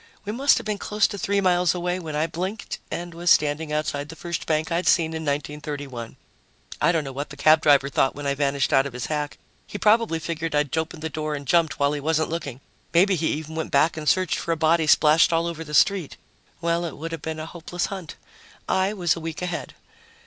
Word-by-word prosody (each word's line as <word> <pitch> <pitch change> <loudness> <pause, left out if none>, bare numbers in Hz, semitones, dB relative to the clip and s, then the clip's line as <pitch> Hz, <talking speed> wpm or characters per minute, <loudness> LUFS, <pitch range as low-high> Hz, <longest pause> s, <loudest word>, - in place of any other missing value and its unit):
We 205 - -2
must 270 +6 +3
have - - -4
been 210 -1 -2
close 210 +1 +1
to 200 - -2
three 200 +2 +1
miles 180 -1 +3
away 180 +1 -1
when 160 -4 -6
I 155 +1 +1
blinked 185 +6 -4
and 175 0 -5
was 170 +1 -1
standing 150 +1 +3
outside 150 -1 -2
the 165 - -8
first 170 0 -5
bank 155 +1 0
I'd 170 +1 0
seen 160 -2 +3
in 160 - -4
1931. 145 -4 -4 0.7
I 160 - +4
don't 165 -3 0
know 135 - -6
what 140 +3 -5
the 140 - -10
cab 155 +2 +5
driver 140 -2 +5
thought 135 -1 +1
when 145 0 -7
I 140 - +1
vanished 140 -1 0
out 135 +1 +4
of 135 - -9
his 125 -1 -4
hack. 150 -1 -3 0.3
He - - -6
probably 215 -4 +3
figured 160 -1 -3
I'd 150 -1 +1
opened 160 0 -3
the 160 - -2
door 155 0 -3
and 145 -1 -7
jumped 165 +2 +2
while 140 +1 +2
he 145 - -2
wasn't 160 +2 0
looking. 145 -6 -5 0.3
Maybe 190 +3 +5
he 165 -3 0
even 155 +1 -3
went 160 0 -3
back 150 +4 +3
and 155 -1 -1
searched 185 -2 +1
for 170 - -3
a 165 - 0
body 160 0 +3
splashed 155 +2 +5
all 165 0 +2
over 165 -1 -4
the 150 -1 -5
street. 185 0 +2 0.4
Well, 170 0 0
it 165 -4 -5
would 165 +3 -6
have 165 -3 -5
been 160 0 -4
a 155 - -4
hopeless 175 +1 -4
hunt. 190 -5 -7 0.5
I 190 +2 +1
was 180 -5 +1
a - - -6
week 165 +1 -5
ahead. 180 -2 -4
160 Hz, 235 wpm, -24 LUFS, 150-175 Hz, 0.7 s, cab